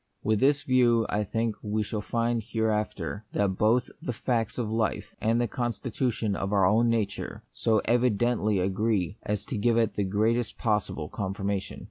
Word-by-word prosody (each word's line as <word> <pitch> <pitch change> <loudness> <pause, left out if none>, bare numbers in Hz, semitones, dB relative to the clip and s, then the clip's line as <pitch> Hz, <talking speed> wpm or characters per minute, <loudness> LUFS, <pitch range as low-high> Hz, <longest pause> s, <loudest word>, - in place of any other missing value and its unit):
With 110 -1 +2
this 145 +2 +3
view 120 -3 +3
I 105 +1 0
think 115 +2 -1
we 105 +1 -1
shall 105 0 -3
find 115 +3 0
here 110 +1 0
after 105 -2 -3
that 95 -2 0
both 115 +4 +3
the 125 - -3
facts 115 -1 -1
of 120 -3 -1
life 110 -1 -1
and 115 +2 +2
the 120 - +1
consti 120 +1 -3
tution 110 -5 0
of 100 0 -3
our 100 -3 +4
own 110 +5 +4
nature 105 -4 -2
so 105 - +1
evidently 120 -2 +2
agree 95 +1 0
as 105 0 -3
to 130 -7 -3
give 115 +2 +3
it 115 -3 +2
the 100 - -1
greatest 110 +5 0
possible 105 -8 -1
confirmation. 100 +1 -3
110 Hz, 175 wpm, -27 LUFS, 100-115 Hz, -, our